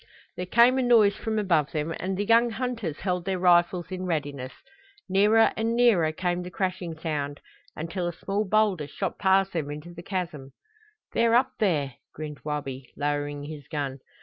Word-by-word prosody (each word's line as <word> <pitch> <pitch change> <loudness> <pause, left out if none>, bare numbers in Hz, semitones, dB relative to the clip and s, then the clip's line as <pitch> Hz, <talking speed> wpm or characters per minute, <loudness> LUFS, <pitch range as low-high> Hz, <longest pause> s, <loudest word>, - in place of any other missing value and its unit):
There 180 - -4
came 240 +6 +5
a - - +3
noise 225 -5 +5
from 220 -1 -3
above 170 -8 +1
them 155 +1 -2
and 190 0 -2
the 205 - -1
young 230 +2 +5
hunters 230 - -3
held 180 -2 -1
their 190 0 -1
rifles 175 0 +3
in 185 0 -4
readiness. 145 -5 -3 0.6
Nearer 210 +4 +4
and 225 +1 0
nearer 215 -10 +4
came 175 +2 -1
the 180 - -6
crashing 180 -2 -3
sound, 145 -3 -3 0.4
until 170 +3 -3
a - - -1
small 200 +5 -2
boulder 205 -6 +1
shot 195 +5 -4
past 195 -1 +3
them 155 -4 -2
into 150 +4 -7
the 170 - -9
chasm. 170 -7 -5 0.6
"They're 230 0 +3
up 245 - +3
there," 150 - 0 0.2
grinned 150 -1 -6
Wabi, 135 -4 -5
lowering 145 0 -2
his 145 -2 -8
gun. 140 -3 -3
180 Hz, 175 wpm, -26 LUFS, 150-205 Hz, 0.6 s, came